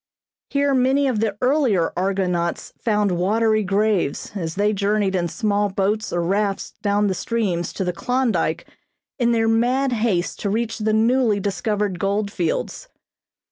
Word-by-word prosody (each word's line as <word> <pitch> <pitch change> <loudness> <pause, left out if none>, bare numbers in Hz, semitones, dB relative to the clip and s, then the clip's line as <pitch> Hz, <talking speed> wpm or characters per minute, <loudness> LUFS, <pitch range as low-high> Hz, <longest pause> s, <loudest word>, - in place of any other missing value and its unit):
Here 280 0 +1
many 265 +2 +3
of 245 -5 0
the 210 -2 -1
earlier 250 - +2
argonauts 180 -2 -1
found 210 -3 +1
watery 215 +5 +2
graves 200 -5 0
as 165 -5 -4
they 205 +2 +1
journeyed 200 0 0
in 175 -2 0
small 205 +1 0
boats 200 +3 -1
or 175 0 0
rafts 195 +2 -1
down 205 0 +1
the 195 - +1
streams 190 -6 -2
to - - -2
the 180 -1 -1
Klondyke 195 -9 0 0.5
in 240 -1 +3
their 225 -1 +2
mad 250 +4 +2
haste 215 -7 0
to 200 - -2
reach 225 +2 -2
the 215 0 0
newly 225 -1 +3
discovered 200 -1 -2
gold 200 +1 -1
fields. 170 -5 -2
210 Hz, 150 wpm, -22 LUFS, 190-225 Hz, 0.5 s, many